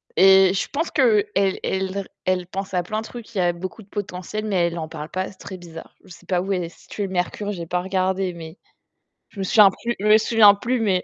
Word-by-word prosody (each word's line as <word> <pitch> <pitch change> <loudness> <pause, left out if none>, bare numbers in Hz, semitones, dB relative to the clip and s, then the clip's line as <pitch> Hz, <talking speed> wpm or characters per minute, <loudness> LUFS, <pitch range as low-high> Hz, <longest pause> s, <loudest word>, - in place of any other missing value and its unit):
Et 190 +1 +6
je 195 - -2
pense 320 +4 -2
qu'elle 230 -7 +3
elle 195 -1 +1
l 190 +1 -2 0.2
elle 185 -1 0
pense 190 +1 -6
à 180 - +2
plein 215 +5 -3
de - - -9
trucs, 230 -1 -11
il 190 - 0
y - - +3
a 175 -1 +3
beaucoup 185 +5 -8
de 200 - -25
potentiel 205 +1 -5
mais 185 -5 +1
elle 170 0 -4
en 160 - -4
parle 155 -1 -8
pas, 185 0 -3
c'est 190 - -13
très 190 - -9
bizarre. 165 -2 -12
Je - - -16
sais - - -14
pas 180 -2 0
où 195 +2 -2
est 180 -3 -2
située 200 +4 -6
le - - -10
mercure, 190 +3 -2
j'ai 175 -4 -5
pas 180 +2 -1
regardé 190 0 -1
mais 165 0 -10 0.7
je - - -17
me - - -1
souviens 205 +1 +6
plus 235 +5 -4
je 210 - -2
me 215 0 +7
souviens 220 -2 +6
plus 245 +4 -2
mais 190 -5 +1
190 Hz, 255 wpm, -22 LUFS, 180-210 Hz, 0.7 s, me